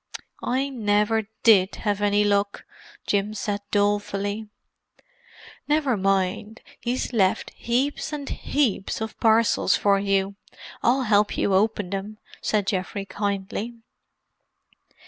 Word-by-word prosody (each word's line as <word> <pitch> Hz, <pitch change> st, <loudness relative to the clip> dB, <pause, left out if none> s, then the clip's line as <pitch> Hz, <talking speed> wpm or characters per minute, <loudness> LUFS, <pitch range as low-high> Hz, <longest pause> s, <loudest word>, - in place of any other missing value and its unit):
"I 265 Hz, +3 st, 0 dB
never 210 Hz, -3 st, +1 dB, 0.2 s
did 200 Hz, -4 st, +5 dB
have 205 Hz, -1 st, -2 dB
any 205 Hz, 0 st, +3 dB
luck," 200 Hz, 0 st, 0 dB, 0.4 s
Jim 205 Hz, +1 st, 0 dB
said 205 Hz, -1 st, -2 dB
dolefully. 205 Hz, +1 st, 0 dB, 1.2 s
"Never 295 Hz, -4 st, +2 dB
mind—he's 200 Hz, +6 st, -2 dB
left 190 Hz, -5 st, +1 dB
heaps 265 Hz, +6 st, -1 dB
and 290 Hz, -2 st, -5 dB
heaps 250 Hz, -9 st, -1 dB
of 220 Hz, 0 st, -5 dB
parcels 225 Hz, -3 st, +3 dB
for 200 Hz, -1 st, +3 dB
you. 195 Hz, 0 st, 0 dB, 0.4 s
I'll 255 Hz, +3 st, +3 dB
help 210 Hz, -2 st, +2 dB
you 200 Hz, -, +1 dB
open 205 Hz, -1 st, +1 dB
them," 200 Hz, +2 st, -4 dB, 0.2 s
said 210 Hz, -2 st, 0 dB
Geoffrey 195 Hz, +1 st, -2 dB
kindly. 200 Hz, +3 st, -3 dB
205 Hz, 105 wpm, -24 LUFS, 200-225 Hz, 1.2 s, did